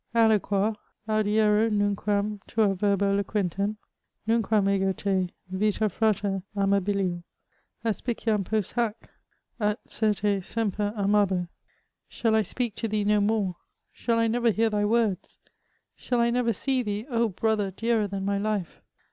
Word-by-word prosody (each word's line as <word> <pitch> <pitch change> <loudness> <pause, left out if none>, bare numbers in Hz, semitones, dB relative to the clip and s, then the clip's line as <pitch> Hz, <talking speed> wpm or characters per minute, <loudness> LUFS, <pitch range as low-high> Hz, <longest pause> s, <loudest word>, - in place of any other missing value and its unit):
Alloqoar? 215 -2 +3 0.3
audiero 215 0 +3
nunquam 205 0 0
tua 210 -3 +2
verba 200 +1 +1
loquentem? 200 0 -1 0.5
Nunquam 220 -3 +2
ego 195 -1 +2
te, 190 -2 -1 0.2
yita 210 +2 +1
frater 205 -2 0 0.2
amabilior, 195 -2 +1 0.6
Aspiciam 225 -2 -1
post 215 0 -2
bac? 235 -3 +1 0.6
at, 210 0 0
certe, 205 -2 0
semper 210 -1 -1
amabo! 200 -3 +2 0.3
*' - - -49
Shall 225 -2 +2
I 220 - +4
speak 235 +1 -3
to 225 - -2
thee 210 -1 0
no 210 0 +3
more? 200 -4 0 0.3
Shall 230 -1 -1
I 230 - +3
never 235 +1 +2
hear 225 +1 +2
thy 205 0 +1
words? 215 -4 0 0.6
Shall 245 -1 -1
I 235 0 +3
never 245 -1 +1
see 260 +5 0
thee, 210 -1 -3
oh! 235 -4 +1
brother 210 +1 0
dearer 220 +2 0
than 195 -1 -4
my 200 0 0
life 205 -4 -3
210 Hz, 140 wpm, -26 LUFS, 200-225 Hz, 0.6 s, I